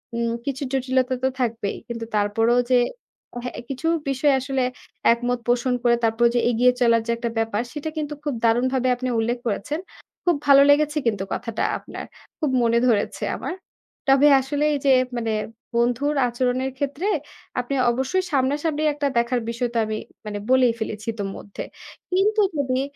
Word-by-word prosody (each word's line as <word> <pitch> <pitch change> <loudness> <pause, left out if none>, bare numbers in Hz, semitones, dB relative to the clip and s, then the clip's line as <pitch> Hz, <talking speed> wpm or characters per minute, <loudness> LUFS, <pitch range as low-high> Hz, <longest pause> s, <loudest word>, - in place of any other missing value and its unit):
উম 235 0 0
কিছু 280 0 -3
জটিলতা 260 -1 +1
তো - - +4
থাকবেই 230 -4 -1
কিন্তু 230 -1 -5
তারপরও 225 +3 +2
যে 250 - +6 0.9
কিছু 275 +4 -3 0.2
বিষয় 275 +2 +2
আসলে 265 0 -1 0.5
একমত 245 +1 -2
পোষণ 245 +1 +2
করে 240 -1 +4
তারপরও 225 +1 +3
যে - - +4
এগিয়ে 245 +2 +4
চলার 230 -1 +4
যে 235 - +1
একটা 235 0 -2
ব্যাপার 225 -1 0
সেটা 300 +1 -4
কিন্তু 300 -1 -2
খুব 290 - -1
দারুণভাবে 255 +3 +2
আপনি 255 +1 -3
উল্লেখ 235 +2 0
করেছেন। 260 +9 -2 0.5
খুব 350 -3 +4
ভালো 280 0 +8
লেগেছে 300 +1 +4
কিন্তু 205 -4 0
কথাটা 230 -2 -3
আপনার। - - -8 0.3
খুব 305 -4 0
মনে 230 0 +3
ধরেছে 215 -4 0
আমার। - - -4 0.5
তবে 275 +2 +6
আসলে 285 +2 -2
এই 285 - -1
যে 275 - +5 0.3
মানে 225 -2 -1 0.4
বন্ধুর 245 +5 +1
আচরণের 255 +2 -1
ক্ষেত্রে 285 +7 -2 0.5
আপনি 250 +3 -2 0.2
অবশ্যই 265 +10 0
সামনা 270 -1 +2
সামনি 310 -2 0
একটা 290 0 -1
দেখার 235 +1 +2
বিষয়টা 235 0 -2
আমি 215 0 -3 0.3
মানে 205 -1 -4
বলেই 255 -2 +5
ফেলেছি 215 0 -5
ইতো 205 -2 -4
মধ্যে। 200 - -8 0.5
কিন্তু 420 +4 +3 0.2
যদি 260 -2 0
250 Hz, 160 wpm, -23 LUFS, 235-280 Hz, 0.9 s, ভালো